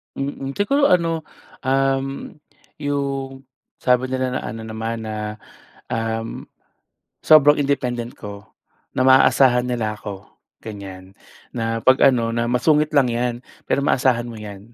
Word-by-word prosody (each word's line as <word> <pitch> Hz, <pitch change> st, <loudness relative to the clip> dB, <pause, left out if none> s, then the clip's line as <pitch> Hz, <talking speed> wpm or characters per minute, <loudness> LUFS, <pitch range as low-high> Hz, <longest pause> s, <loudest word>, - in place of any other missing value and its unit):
Mm. 135 Hz, 0 st, -4 dB
Siguro 280 Hz, +8 st, +2 dB
ano, 165 Hz, -3 st, +1 dB, 0.4 s
um, 135 Hz, +1 st, 0 dB, 0.5 s
'yong 135 Hz, -2 st, -3 dB, 0.4 s
sabi 125 Hz, 0 st, +2 dB
nila 130 Hz, 0 st, -1 dB
na -, -, -8 dB
ano 110 Hz, +1 st, -6 dB
naman 110 Hz, +1 st, -4 dB
na, 110 Hz, -1 st, -5 dB, 0.8 s
um, 115 Hz, 0 st, -3 dB, 0.8 s
sobrang 150 Hz, -1 st, +7 dB
independent 125 Hz, -4 st, -2 dB
ko, 100 Hz, -1 st, -9 dB, 0.5 s
na 130 Hz, -, +2 dB
maaasahan 130 Hz, -1 st, +5 dB
nila 115 Hz, -4 st, -2 dB
ako, 100 Hz, -1 st, -8 dB, 0.4 s
ganyan. 95 Hz, -3 st, -9 dB, 0.4 s
Na 115 Hz, -1 st, -1 dB
'pag 130 Hz, +1 st, +4 dB
ano 120 Hz, -4 st, +3 dB
na, 115 Hz, 0 st, 0 dB
"Masungit 150 Hz, +4 st, +2 dB
lang 140 Hz, -3 st, +4 dB
'yan 120 Hz, 0 st, -2 dB, 0.2 s
pero -, -, +1 dB
maasahan 125 Hz, -4 st, +2 dB
mo 115 Hz, -, -8 dB
'yan," 105 Hz, +1 st, -10 dB
125 Hz, 125 wpm, -21 LUFS, 115-135 Hz, 0.8 s, sobrang